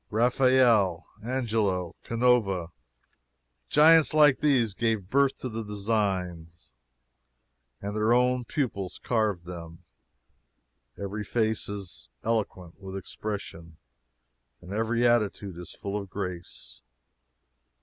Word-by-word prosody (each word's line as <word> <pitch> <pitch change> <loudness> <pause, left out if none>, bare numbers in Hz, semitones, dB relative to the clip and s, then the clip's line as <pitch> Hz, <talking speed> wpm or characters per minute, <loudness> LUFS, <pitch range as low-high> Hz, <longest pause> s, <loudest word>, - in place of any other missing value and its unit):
Raphael, 120 -6 +3 0.2
Angelo, 110 -8 -1
Canova 115 -8 +1 1.0
giants 160 0 +6
like 150 -3 +6
these 130 -8 +2
gave 110 -2 -1
birth 140 0 +3
to - - -3
the 115 -1 -4
designs, 95 - -3 1.1
and 100 +1 -4
their 110 +1 +2
own 125 +1 +3
pupils 110 - -3
carved 105 -7 0
them. 85 -2 -9 1.1
Every 100 +1 -4
face 110 0 -1
is 100 -3 -7
eloquent 100 -7 -2
with 95 0 -6
expression, 90 -5 -7 0.8
and 90 +2 -9
every 115 +3 +1
attitude 105 -6 0
is 90 - -7
full 100 0 -6
of 100 -2 -4
grace. 90 -9 -7
105 Hz, 100 wpm, -27 LUFS, 95-120 Hz, 1.1 s, giants